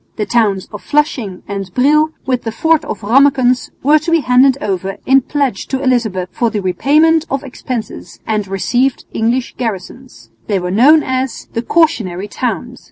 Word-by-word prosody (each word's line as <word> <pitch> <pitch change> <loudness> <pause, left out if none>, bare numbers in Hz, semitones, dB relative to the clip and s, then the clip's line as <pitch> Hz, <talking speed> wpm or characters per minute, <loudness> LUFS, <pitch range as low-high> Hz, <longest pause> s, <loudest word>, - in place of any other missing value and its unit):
The 210 - -2
towns 205 -6 +1
of 210 - -7
Flushing 260 - -1
and 195 -2 -5
Brill 300 +4 +3 0.2
with 255 -2 0
the 225 - -4
fort 320 +6 +1
of 215 - -5
Rammekens 255 +2 +3
were 300 +3 +5
to 310 - -5
be 330 -1 +3
handed 255 +1 +4
over 195 -5 -3
in 270 +1 +5
pledge 270 -6 -2
to 265 0 -3
Elizabeth 220 -8 0
for 235 - 0
the 215 - -3
repayment 300 - +2
of 275 +1 -2
expenses 250 -3 -7
and 215 -2 -1
received 245 +7 -1
English 235 +3 -1
garrisons. 240 +3 -6 0.2
They 205 - 0
were 180 -1 -3
known 285 +10 +5
as 260 -1 -3
"the 230 - -1
cautionary 225 - 0
towns." 245 +2 -4
250 Hz, 165 wpm, -15 LUFS, 205-275 Hz, 0.2 s, were